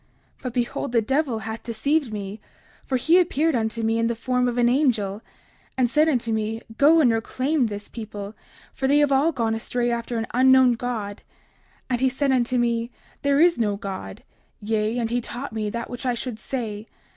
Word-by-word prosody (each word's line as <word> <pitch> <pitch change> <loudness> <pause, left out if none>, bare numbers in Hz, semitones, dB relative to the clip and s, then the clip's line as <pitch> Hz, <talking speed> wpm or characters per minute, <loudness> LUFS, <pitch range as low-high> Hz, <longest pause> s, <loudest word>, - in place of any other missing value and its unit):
30:53 - - -27
But 255 -3 -5
behold, 240 -1 -2
the 230 - +4
devil 265 -1 0
hath 220 +2 -5
deceived 260 +4 0
me; 205 0 -6 0.4
for 260 - -1
he 325 +8 +4
appeared 325 -3 +1
unto 225 0 -1
me 225 +1 +1
in 230 - +2
the 235 - -1
form 250 +2 0
of 245 0 -2
an 240 -1 +4
angel, 230 -7 +1 0.6
and 255 -2 +3
said 305 +6 +3
unto 240 -5 0
me: 220 0 -1 0.2
Go 315 +3 +6
and 250 -6 +5
reclaim 255 +4 0
this 205 -1 -6
people, 210 -3 -7 0.4
for 265 - -1
they 285 +2 +4
have 290 -1 +3
all 280 +5 +3
gone 230 -6 -1
astray 240 +2 -1
after 235 0 -2
an 225 - -1
unknown 260 0 +6
God. 225 -4 -4 0.7
And 245 -1 -1
he 265 - +4
said 270 +1 0
unto 250 -1 +1
me: 235 -1 0 0.3
There 280 0 +2
is 340 -3 +4
no 210 -3 +1
God; 190 - -7 0.4
yea, 215 +2 -1
and 230 -2 -1
he 245 0 +1
taught 245 +2 -6
me 215 -1 -2
that 235 +2 -4
which 245 +2 -6
I 245 - +1
should 235 -2 -5
say. 220 -4 -4
240 Hz, 200 wpm, -24 LUFS, 225-265 Hz, 0.7 s, Go